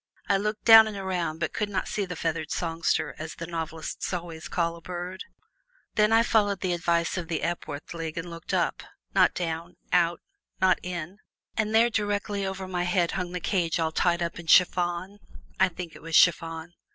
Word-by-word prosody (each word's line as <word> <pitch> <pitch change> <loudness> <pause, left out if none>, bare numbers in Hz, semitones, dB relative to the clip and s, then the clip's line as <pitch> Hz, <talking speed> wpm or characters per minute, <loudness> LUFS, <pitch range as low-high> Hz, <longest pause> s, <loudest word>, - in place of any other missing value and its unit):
I 200 - +3
looked 210 +2 -3
down 225 -1 +10
and 210 -2 -5
around, 180 -4 -2
but 160 - -2
could 210 - -1
not 190 -2 -2
see 205 - -2
the 180 -1 -6
feathered 160 -2 -2
songster, 165 -1 -1
as 155 0 -6
the 165 - -6
novelists 160 -1 -4
always 170 -3 -5
call 170 -1 -1
a 170 - -13
bird. 180 +2 -6 0.7
Then 210 0 +3
I 225 +1 +6
followed 205 -5 +2
the 185 -2 0
advice 170 +1 0
of 175 -2 -4
the 165 -1 -2
Epworth 160 -4 -4
League 165 -1 -5
and 165 +1 -4
looked 170 -1 -8
up, - - 0 0.3
not - - +4
down, 170 0 -4 0.2
out, 175 -1 +3 0.4
not 185 -1 +4
in, 180 +2 -6 0.4
and 215 0 0
there 235 +2 +5
directly 205 -1 -1
over 190 0 -5
my 180 -1 -2
head 175 -1 +1
hung 180 -2 -3
the 180 - -3
cage 170 -3 0
all 160 -1 0
tied 170 +1 +1
up 170 0 -4
in 170 - -10
chiffon 180 +3 +3 0.4
(I - - +5
think 175 -1 -8
it - - -12
was 165 0 -3
chiffon). 165 0 +3
175 Hz, 195 wpm, -27 LUFS, 165-190 Hz, 0.7 s, down